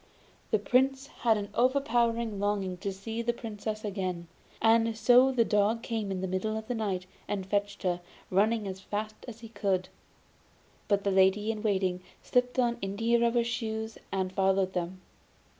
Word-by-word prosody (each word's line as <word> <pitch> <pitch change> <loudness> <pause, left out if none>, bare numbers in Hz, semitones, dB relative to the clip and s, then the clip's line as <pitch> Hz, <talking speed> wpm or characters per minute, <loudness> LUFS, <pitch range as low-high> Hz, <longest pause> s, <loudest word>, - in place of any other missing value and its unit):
The 215 - +3
Soldier 265 +6 +1
had 225 -2 +3
an 205 -1 -4
overpowering 235 -4 +1
longing 200 -2 0
to 200 +2 -3
see 220 +4 -5
the 240 +1 0
Princess 215 -2 -5
again, 185 -4 -3 0.3
and 225 0 +3
so 250 +3 +6
the 240 -3 +3
dog 215 +3 +2
came 220 -3 -2
in 190 -1 -2
the 190 - -1
middle 190 +4 -1
of 220 0 -6
the 245 - -1
night 200 -5 -2 0.2
and 195 -2 -2
fetched 200 +1 -1
her, 180 -1 0 0.3
running 210 +3 +2
as 190 0 -5
fast 215 +2 -3
as 230 -1 -9
he 225 - -9
could. 195 -4 -1 1.0
But 200 -1 +2
the 200 - +1
lady 190 +3 +4
in 215 -1 -5
waiting 190 -4 0 0.2
slipped 250 0 +1
on 240 -2 +2
india 225 +5 +1
rubber 235 0 +3
shoes 220 -1 -3
and 190 -1 -1
followed 190 0 +2
them. 180 +1 -3
215 Hz, 170 wpm, -29 LUFS, 195-230 Hz, 1.0 s, so